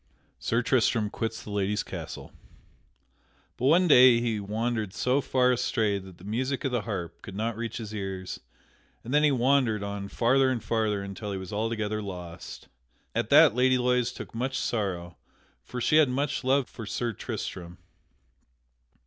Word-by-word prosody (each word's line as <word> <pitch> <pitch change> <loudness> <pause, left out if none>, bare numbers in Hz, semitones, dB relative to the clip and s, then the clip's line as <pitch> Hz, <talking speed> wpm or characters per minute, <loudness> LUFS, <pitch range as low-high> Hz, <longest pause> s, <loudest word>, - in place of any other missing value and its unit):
[Sidenote: - - -39
Sir 115 +1 0
Tristram 115 -4 +2
quits 115 0 -4
the 105 - -8
Lady's 100 0 0
castle] - - -7 1.2
But 130 - 0
one 175 +5 +5
day 125 -5 +8
he 115 -3 -1
wandered 110 0 -2
so 130 +3 +1
far 125 -1 +2
astray 110 -4 0
that 95 -2 -13
the - - -16
music 130 +6 -2
of 135 - 0
the 120 -2 0
harp 95 -6 -5
could 100 -3 -9
not 110 +2 -2
reach 115 0 -4
his 110 -2 -6
ears, 95 -3 -5 0.6
and 125 - -5
then 150 - +5
he 150 - +6
wandered 125 -4 +2
on 100 -1 -4
farther 130 +5 +3
and 125 -3 -2
farther 110 -3 0
until 100 +1 -6
he - - -3
was 95 +1 -7
altogether 110 0 -1
lost. 90 -4 -8 0.5
At - - -1
that - - +7
Lady 130 +1 +3
Loise 125 -1 +1
took - - -9
much 130 +3 -2
sorrow 90 -6 -2 0.5
for 125 - -6
she 140 +6 +3
had 155 -4 +5
much 140 +3 -1
love 135 0 +2
for 115 - -9
Sir 120 +3 -2
Tristram. 90 -3 -6
115 Hz, 170 wpm, -27 LUFS, 100-125 Hz, 1.2 s, day